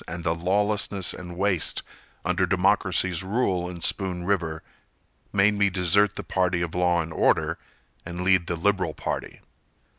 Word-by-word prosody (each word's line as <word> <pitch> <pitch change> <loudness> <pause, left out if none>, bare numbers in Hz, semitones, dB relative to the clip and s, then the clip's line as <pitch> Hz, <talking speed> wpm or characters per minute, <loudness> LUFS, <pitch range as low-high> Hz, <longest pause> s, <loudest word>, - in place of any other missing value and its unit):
And 85 +1 -5
the 80 - +1
lawlessness 100 +2 0
and 90 -1 -9
waste 95 -3 0 0.4
Under - - +1
democracy's 90 -3 +2
rule 95 -3 0
in 85 -2 -8
Spoon 90 -2 0
River 85 -5 -1 0.7
Made 100 +1 +4
me 100 -1 +2
desert 95 +2 +2
the - - -5
party 90 -2 0
of 85 - -4
law 90 -1 +2
and 80 0 -8
order - - +2 0.4
And 85 +1 -6
lead 90 -1 +3
the 85 - -1
liberal 90 -2 0
party. - - -4
90 Hz, 150 wpm, -25 LUFS, 85-100 Hz, 0.7 s, Made